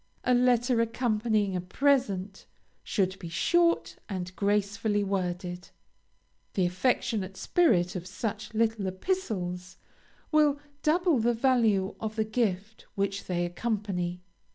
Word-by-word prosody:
A 250 - +3
letter 245 -1 +3
accompanying 220 -4 0
a 180 - -1
present, 200 -3 0 0.4
should 190 -3 -1
be 170 - -7
short 340 - +2
and 185 -2 -5
gracefully 205 +1 +1
worded. 180 -2 -3 0.9
The 185 - +2
affectionate 195 0 0
spirit 200 - +2
of 180 0 -5
such 210 +3 -4
little 220 -3 +1
epistles 185 - -3 0.5
will 300 -2 +4 0.2
double 335 -2 +3
the 235 +1 +2
value 225 -6 +2
of 220 -1 -4
the 220 - +1
gift 215 -2 -2
which 200 -1 -1
they 175 -1 -1
accompany. 180 -2 -2
210 Hz, 115 wpm, -28 LUFS, 185-240 Hz, 0.9 s, will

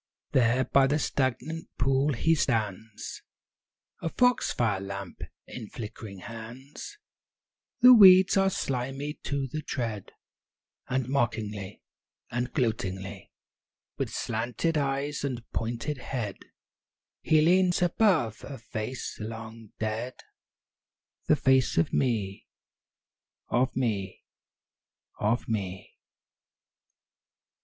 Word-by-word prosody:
IV - - -60
There 125 +1 +3
by 135 +2 +4
the 145 +2 +2
stagnant 145 +3 -1
pool 135 +3 +2
he 160 +7 +2
stands, 110 -6 -2 0.8
A 165 - -1
foxfire 125 - +2
lamp 100 -1 -7 0.2
in 110 -4 -8
flickering 105 -4 -8
hands; 125 - -9 0.8
The 250 +1 +10
weeds 190 -4 +8
are 195 0 +4
slimy 135 -1 -3
to 140 -1 -2
the 155 +4 -4
tread, 115 -8 -4 0.8
And 130 -1 -1
mockingly, 110 -6 -2 0.5
and 120 +1 -2
gloatingly, 100 - -2 0.7
With - - -1
slanted 120 +8 -2
eyes 140 0 -1
and 125 -4 -3
pointed 120 +5 -3
head, 115 -6 -4 0.8
He 155 -1 +4
leans 180 +2 +4
above 175 - +2
a 135 0 -7
face 110 +2 -5
long 110 0 -7
dead, 110 +3 -3 1.1
The 155 - +6
face 130 -3 +3
of 80 - +2
me! 105 -7 0 1.0
of 130 +2 +1
me! 110 -7 -2 1.0
of 110 +3 +1
me! 95 -4 -4
125 Hz, 100 wpm, -28 LUFS, 110-140 Hz, 1.1 s, The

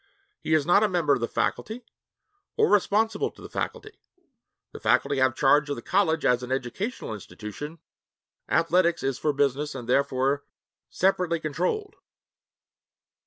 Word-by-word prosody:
He 160 - +1
is 150 -3 +2
not 175 +5 +5
a 215 - +3
member 170 -6 +2
of 135 - 0
the 115 - -1
faculty 230 +2 -2 0.7
or 440 - +4
responsible 210 +2 +2
to - - -21
the - - -11
faculty. 430 -1 -5 0.7
The - - -9
faculty 140 - +2
have 130 -1 +2
charge 145 +3 +3
of 145 - -1
the 120 - -9
college 165 -4 +1
as 125 0 +3
an 125 0 -7
educational 135 - -3
institution; 105 - -8 0.7
athletics 170 +1 +2
is 135 -1 -1
for 150 - +1
business 145 +1 0
and 125 -3 -7
therefore 135 +2 +1 0.5
separately 180 -3 +1
controlled. 180 - -2
150 Hz, 145 wpm, -26 LUFS, 135-185 Hz, 0.7 s, not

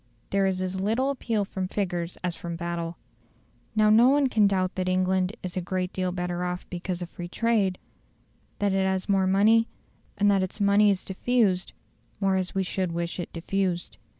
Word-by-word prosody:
There 195 0 +2
is 185 -1 -1
as 185 0 -3
little 235 +7 +1
appeal 225 -6 -1
from 190 -1 -4
figures 175 -3 -3
as 175 -2 -1
from 170 -1 -6
battle. 170 0 -4 0.8
Now 215 0 +5
no 235 +4 +7
one 280 -1 +3
can 215 -4 +4
doubt 185 -2 0
that 185 -1 -2
England 185 +2 +1
is 180 -1 -5
a 185 - -1
great 185 +1 -3
deal 185 -1 -1
better 180 0 -3
off 180 0 -4
because 180 0 -3
of 175 - -9
free 175 - -7
trade; 205 -2 +1 0.8
that 205 -1 +1
it 195 0 +2
has 190 -1 0
more 195 -2 +2
money, 215 +4 +4 0.5
and 205 0 +4
that 195 -1 +3
its 185 +3 -4
money 205 +1 +5
is 195 -2 0
diffused 195 -2 +1 0.5
more 195 -1 +2
as 185 0 -2
we 195 - +1
should 185 -1 -2
wish 170 +1 -3
it 175 - -5
diffused. 175 0 -2
190 Hz, 190 wpm, -26 LUFS, 180-205 Hz, 0.8 s, no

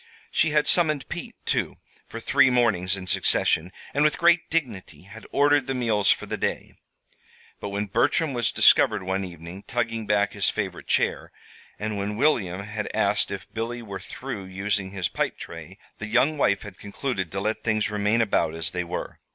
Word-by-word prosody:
She 160 - +2
had 150 0 +2
summoned 155 -4 +3
Pete, - - -6
too, - - -1 0.3
for - - -7
three 130 - +4
mornings 100 -7 +2
in 95 - -7
succession, 90 -1 +2 0.2
and 145 - +2
with 150 - +2
great 170 -1 +3
dignity 110 - -3
had 110 +4 -12
ordered 145 -1 +3
the 135 - -1
meals 110 -5 +1
for - - +2
the - - -4
day. - - -3 0.9
But 100 - -5
when 100 +1 -2
Bertram 140 - +1
was 120 -3 +1
discovered 105 -3 +5
one 95 +1 -1
evening 85 +1 -9
tugging 115 -3 -2
back 105 -1 +2
his 100 -1 +1
favorite 95 -4 -4
chair, - - 0 0.5
and 105 0 -3
when 105 +1 -3
William 100 -9 +1
had 105 +1 -4
asked - - +2
if - - -6
Billy 120 +2 -4
were 100 -3 -6
through 125 -7 -7
using 95 +1 -2
his 95 -2 -2
pipe - - -2
tray, - - -9 0.2
the 105 - -5
young 125 +7 +3
wife 100 -9 +1
had 100 -4 -11
concluded 100 - -4
to 95 - -3
let 110 +3 -2
things 110 -3 0
remain 105 +2 +1
about 100 -7 +1
as 80 0 -1
they 90 0 -2
were. 85 - -6
105 Hz, 185 wpm, -25 LUFS, 95-125 Hz, 0.9 s, discovered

